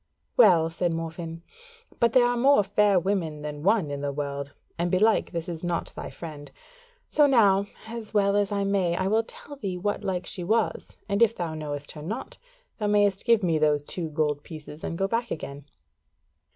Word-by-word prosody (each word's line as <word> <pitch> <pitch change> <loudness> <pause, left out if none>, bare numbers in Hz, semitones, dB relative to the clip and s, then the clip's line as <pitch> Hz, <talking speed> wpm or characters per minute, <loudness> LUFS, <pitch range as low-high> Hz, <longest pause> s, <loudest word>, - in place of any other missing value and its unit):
"Well," 175 -8 +6
said 175 +1 -1
Morfinn, 165 0 -5 0.6
"but 235 -1 +3
there 255 -2 +6
are 245 0 +1
more 260 -2 +5
fair 205 -1 +3
women 170 -5 -2
than 150 -1 -5
one 190 -4 +2
in 140 0 -4
the 145 0 -1
world, 140 0 -4 0.2
and 175 +1 -1
belike 210 +5 +3
this 170 -1 -4
is 170 -1 -6
not 175 -1 -2
thy - - -6
friend: 150 -4 -9 0.6
so 295 -1 +4
now, 200 -7 +4 0.2
as 225 -1 -7
well 200 -2 +3
as 205 -1 +1
I 200 -1 0
may, 195 -3 +1
I 185 - -1
will 215 +3 +3
tell 285 +5 -11
thee 195 -7 -3
what 205 +3 -2
like 185 -1 -2
she 180 - -5
was, 220 +4 0 0.2
and 200 +1 0
if 230 -1 +5
thou 170 -3 -3
knowest 145 -2 -5
her 150 - -9
not, 235 - -6 0.4
thou 210 - 0
mayst 205 -2 +2
give 230 -4 +4
me 165 -3 +2
those 150 -1 +2
two 165 +2 -4
gold 150 -1 0
pieces 155 -1 -10
and 165 - -3
go 195 - +1
back 230 +2 -1
again. 140 -4 -6
180 Hz, 195 wpm, -26 LUFS, 160-210 Hz, 0.6 s, Well